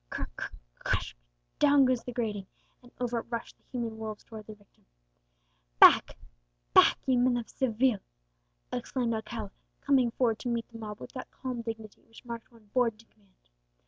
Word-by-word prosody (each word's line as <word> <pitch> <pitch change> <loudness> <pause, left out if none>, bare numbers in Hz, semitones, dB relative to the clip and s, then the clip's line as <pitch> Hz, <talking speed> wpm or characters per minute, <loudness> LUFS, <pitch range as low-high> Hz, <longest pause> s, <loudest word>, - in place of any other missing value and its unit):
Cr - - -4
cr - - -4 0.4
cr - - +3
ash! - - -7 0.4
down 285 -2 +6
goes 255 -2 +1
the 250 - -5
grating, 215 -5 -2 0.3
and 245 -1 -17
over 240 -1 0
it - - -9
rush 235 -1 -4
the - - -40
human 230 -3 -3
wolves 215 -1 -5
towards 220 -2 -10
their 215 - -8
victim. 205 -1 -28 1.0
"Back, - - +8 0.6
back, - - +7
ye 260 - +3
men 245 0 +3
of 235 - -4
Seville!" 245 -3 +1 0.7
exclaimed 245 -1 -1
Alcala, 220 -2 -4 0.3
coming 265 -4 +3
forward 230 -2 +1
to 245 - -3
meet 235 -1 -1
the 230 -1 -10
mob 210 -1 -6
with - - -9
that 255 - -7
calm 255 -2 -5
dignity 225 -2 -7
which 225 +2 -16
marked 235 0 -7
one 220 -3 -21
born 235 -4 +2
to 225 - -18
command. 200 -4 -32
230 Hz, 180 wpm, -30 LUFS, 220-250 Hz, 1.0 s, Back